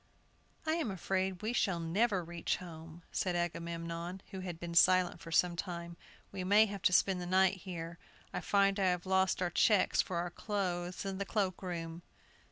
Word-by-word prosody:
"I 315 - +1
am 315 -9 -1
afraid 190 0 -2
we 220 +3 -1
shall 190 -7 +1
never 190 +4 +1
reach 170 0 -2
home," 165 -1 -10
said 180 -2 -1
Agamemnon, 170 +1 -3
who 190 - -5
had 180 -3 -6
been 170 -1 -5
silent 180 +1 +5
for 165 - -9
some 175 +1 +3
time; 170 -1 -5 0.4
"we 190 -2 -4
may 205 +4 +6
have 200 -3 -6
to - - +4
spend 185 0 +3
the 175 - -5
night 190 +1 +4
here. 170 -3 -7 0.3
I - - -2
find 200 0 +3
I 195 - +2
have 180 0 0
lost 190 0 +2
our 175 - -1
checks 200 +2 +4
for 180 - -4
our 175 +1 -2
clothes 180 -3 -3
in 195 -1 -3
the - - 0
cloak 195 -3 -1
room!" 170 -2 -5
180 Hz, 185 wpm, -33 LUFS, 170-195 Hz, 0.4 s, may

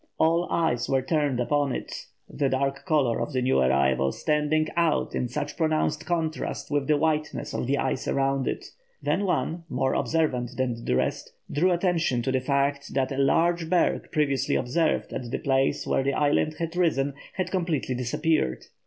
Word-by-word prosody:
All 165 +2 +2
eyes 140 -8 0
were 135 -1 +2
turned 145 -3 0
upon 140 +2 +1
it, - - -6 0.2
the 140 -2 -1
dark 135 +3 -1
colour 140 -8 +2
of 150 - -3
the 130 - +1
new 130 - +3
arrival 65 0 +2
standing 150 - +1
out 170 -3 +1
in 125 - -1
such 145 +4 -4
pronounced 155 -2 0
contrast 165 -4 -2
with 145 -1 0
the 150 -1 +3
whiteness 155 0 -1
of - - -2
the 140 +2 +1
ice - - -1
around 135 -1 +1
it. - - -3 0.4
Then 200 - +1
one, 170 -2 -1
more 130 +1 0
observant 135 -7 0
than 120 -3 -1
the - - +1
rest, - - -1 0.2
drew 170 +6 +2
attention 170 -8 +1
to 130 - 0
the 130 0 +1
fact 140 +1 -1
that 135 -1 +1
a 135 - -3
large 165 +4 +2
berg 180 -2 +1
previously 140 -4 +1
observed 155 +6 0
at 120 - -4
the - - -2
place 135 -1 +1
where - - +1
the 140 +1 0
island 150 +1 +1
had 165 0 -4
risen, 145 -6 +1 0.2
had 185 -2 -3
completely 170 -8 -1
disappeared. 125 - 0
145 Hz, 180 wpm, -26 LUFS, 130-160 Hz, 0.4 s, new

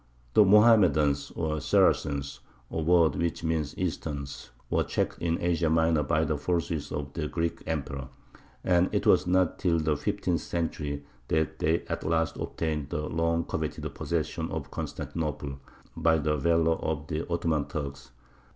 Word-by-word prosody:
The 105 - +7
Mohammedans, 95 -10 +5
or 80 -2 -1
Saracens 70 0 +2 0.3
(a 80 - -2
word 85 0 +4
which 85 -1 -2
means 80 -3 -1
"Easterns"), 75 -7 -4 0.2
were - - +3
checked - - -2
in 85 0 0
Asia 85 -1 +1
Minor 80 -1 +3
by 75 +2 +1
the 75 -2 -1
forces 80 -2 -1
of 70 -1 -4
the 80 -2 -2
Greek 85 +1 -2
Emperor; 70 -4 -3 0.6
and 90 0 +3
it - - 0
was 90 - +4
not 90 -1 +2
till 85 -3 +2
the 80 -1 +1
fifteenth 95 0 -1
century 75 -4 -3 0.2
that 80 0 0
they 80 +2 +1
at - - -4
last 80 0 0
obtained 75 -4 -3
the 75 +1 -2
long 85 0 0
coveted 80 -1 -4
possession - - -2
of - - -5
Constantinople, 75 -4 -4 0.4
by 80 -1 +3
the 75 0 0
valour 80 +2 +2
of 80 -1 -3
the 80 +2 -4
Ottoman 80 -3 0
Turks. 70 -4 -5
80 Hz, 150 wpm, -28 LUFS, 75-85 Hz, 0.6 s, The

